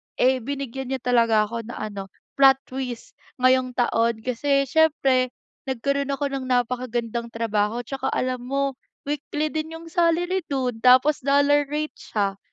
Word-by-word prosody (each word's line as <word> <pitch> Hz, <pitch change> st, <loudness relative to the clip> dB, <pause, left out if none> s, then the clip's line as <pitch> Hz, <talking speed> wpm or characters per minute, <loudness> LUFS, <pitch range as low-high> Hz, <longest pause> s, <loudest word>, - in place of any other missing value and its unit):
eh, 260 Hz, 0 st, +3 dB
binigyan 265 Hz, 0 st, -5 dB
niya 265 Hz, -1 st, -4 dB
talaga 230 Hz, -3 st, +3 dB
ako 230 Hz, +1 st, -5 dB
ng 240 Hz, -, -7 dB
ano, 200 Hz, -2 st, -6 dB, 0.3 s
plot 270 Hz, -1 st, +8 dB
twist 255 Hz, -2 st, -6 dB, 0.2 s
ngayong 255 Hz, 0 st, +2 dB
taon. 230 Hz, -2 st, +1 dB
Kasi 275 Hz, +3 st, +1 dB
siyempre, 275 Hz, -4 st, +3 dB, 0.4 s
nagkaroon 280 Hz, +2 st, -1 dB
ako 280 Hz, 0 st, -2 dB
ng 270 Hz, -1 st, -3 dB
napakagandang 245 Hz, -2 st, -1 dB
trabaho, 225 Hz, 0 st, -1 dB
'tsaka 265 Hz, +2 st, -4 dB
alam 255 Hz, -1 st, -1 dB
mo, 275 Hz, -1 st, -1 dB, 0.2 s
weekly 295 Hz, +1 st, -3 dB
din 315 Hz, +1 st, -4 dB
'yong 330 Hz, 0 st, -10 dB
salary 350 Hz, +1 st, +2 dB
do'n, 255 Hz, -5 st, -2 dB
tapos 255 Hz, +5 st, +5 dB
dollar 285 Hz, +1 st, +3 dB
rate 300 Hz, +2 st, -3 dB
siya. 200 Hz, -2 st, -2 dB
255 Hz, 145 wpm, -24 LUFS, 235-280 Hz, 0.4 s, plot